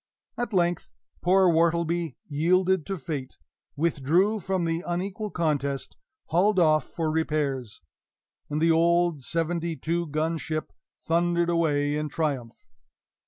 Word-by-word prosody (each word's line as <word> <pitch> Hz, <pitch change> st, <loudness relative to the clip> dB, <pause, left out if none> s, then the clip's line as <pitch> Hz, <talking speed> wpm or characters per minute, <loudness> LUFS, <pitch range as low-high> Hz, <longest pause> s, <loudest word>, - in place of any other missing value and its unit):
At 240 Hz, 0 st, -3 dB
length, 175 Hz, -3 st, 0 dB, 0.3 s
poor 185 Hz, +1 st, +4 dB
Wortleby 170 Hz, -2 st, +1 dB
yielded 180 Hz, +3 st, +1 dB
to 195 Hz, -, -2 dB
fate 140 Hz, -4 st, -5 dB, 0.4 s
withdrew 170 Hz, +7 st, +2 dB
from 190 Hz, -2 st, -1 dB
the 165 Hz, 0 st, -1 dB
unequal 190 Hz, +4 st, -3 dB
contest 145 Hz, -6 st, -1 dB, 0.3 s
hauled 190 Hz, +5 st, +3 dB
off 155 Hz, -4 st, +4 dB
for 160 Hz, -2 st, -2 dB
repairs, 145 Hz, -, -2 dB, 0.7 s
and 150 Hz, +1 st, -1 dB
the 165 Hz, +1 st, +4 dB
old 170 Hz, -1 st, +3 dB
seventy 165 Hz, +3 st, -1 dB
two 170 Hz, +1 st, -1 dB
gun 155 Hz, +2 st, -1 dB
ship 155 Hz, 0 st, -4 dB, 0.3 s
thundered 170 Hz, +1 st, +1 dB
away 145 Hz, -3 st, +1 dB
in 150 Hz, 0 st, -2 dB
triumph. 135 Hz, -7 st, -3 dB
165 Hz, 120 wpm, -26 LUFS, 150-175 Hz, 0.7 s, poor